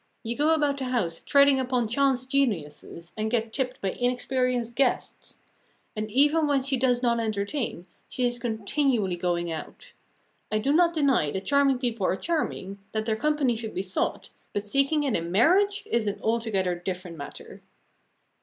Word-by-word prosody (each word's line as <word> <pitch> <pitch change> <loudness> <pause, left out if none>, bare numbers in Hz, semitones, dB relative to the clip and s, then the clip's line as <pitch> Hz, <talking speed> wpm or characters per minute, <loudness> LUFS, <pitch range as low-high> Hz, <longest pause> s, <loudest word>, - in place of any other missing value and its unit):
You 235 +1 -3
go 305 +4 +3
about 290 -2 +1
the 265 - -2
house 230 -10 -1
treading 280 -1 +5
upon 250 -3 0
chance 260 +2 +2
geniuses, 175 - -2
and 215 0 -2
get 225 -1 -1
tipped 255 -2 -2
by 195 - 0
inexperienced 245 0 -1
guests. 265 -1 -1 0.6
And 215 0 -3
even 295 +6 +3
when 280 -2 +2
she 270 0 +2
does 250 -1 +1
not 235 -1 +2
entertain, 215 - -2 0.2
she 255 - -2
is 245 0 -1
continually 225 -2 0
going 175 -1 -1
out. 160 - -8 0.6
I 215 - +2
do 270 +7 +1
not 340 +1 +4
deny 275 - +2
that 190 +6 -4
charming 280 -2 +3
people 235 -6 -1
are - - +1
charming, 200 - -3
that 215 0 -1
their 220 -1 +1
company 285 0 +1
should 220 -1 -6
be 185 - -1
sought, 185 -1 -2 0.2
but 205 0 -3
seeking 275 +6 +2
it 270 -6 0
in 170 +1 -2
marriage 390 - +3
is 230 -2 0
an 205 - -2
altogether 220 -5 0
different 180 0 -5
matter. 145 -3 -10
240 Hz, 170 wpm, -26 LUFS, 200-275 Hz, 0.6 s, treading